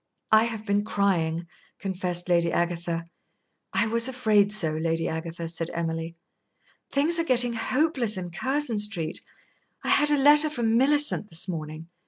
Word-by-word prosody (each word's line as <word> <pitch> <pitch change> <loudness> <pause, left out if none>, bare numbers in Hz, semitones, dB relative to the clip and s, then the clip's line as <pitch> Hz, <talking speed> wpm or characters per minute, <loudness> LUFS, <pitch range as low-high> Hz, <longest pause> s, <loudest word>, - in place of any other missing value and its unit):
"I 220 +1 +6
have 225 -2 -5
been 205 0 +1
crying," 175 -6 0 0.3
confessed 180 -2 -3
Lady 170 -1 +2
Agatha. 170 -1 -2 0.7
"I 230 - +1
was 230 +2 +2
afraid 215 -6 +2
so, 180 -7 -1
Lady 165 +1 -1
Agatha," 165 +1 -5
said 165 0 -4
Emily. 165 0 -3 0.8
"Things 315 +5 +2
are - - +2
getting 245 -5 +2
hopeless 255 - 0
in 175 -2 -6
Curzon 260 - -1
Street. 190 -7 -1 0.6
I - - -2
had 295 0 +5
a 295 - +3
letter 295 +2 +6
from 235 -6 -1
Millicent 285 -3 +2
this 165 +3 -1
morning. 155 -2 -6
200 Hz, 150 wpm, -25 LUFS, 170-245 Hz, 0.8 s, I